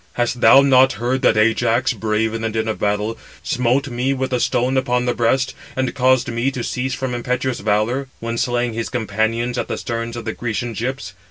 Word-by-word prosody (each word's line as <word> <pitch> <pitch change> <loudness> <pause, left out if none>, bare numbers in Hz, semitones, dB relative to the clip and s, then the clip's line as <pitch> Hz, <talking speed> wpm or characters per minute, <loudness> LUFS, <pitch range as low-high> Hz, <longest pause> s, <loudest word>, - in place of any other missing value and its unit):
Hast 120 0 -1
thou 135 - +8
not 130 -1 +5
heard 125 +4 -1
that 110 - +3
Ajax, 115 +3 +2
brave 110 0 -1
in 115 - -3
the 115 - -1
din 110 0 -2
of 110 - -2
battle, 105 +2 -1 0.2
smote 125 +1 +1
me 130 +2 -1
with 130 0 -2
a 125 - +1
stone 125 +2 +1
upon 125 -2 +1
the 125 - +1
breast, 130 +3 +1 0.2
and 130 -1 -1
caused 130 -2 +2
me 120 +3 0
to 130 -3 -5
cease 130 +2 -2
from 130 -2 -3
impetuous 125 +1 -2
valour, 110 +6 0
when 115 0 -3
slaying 120 -1 0
his 115 0 -3
companions 115 +1 -1
at - - -2
the - - -3
sterns 115 -1 -4
of 115 - -7
the 110 - -2
Grecian 120 0 -3
ships? 130 +5 -4
120 Hz, 205 wpm, -20 LUFS, 115-130 Hz, 0.2 s, thou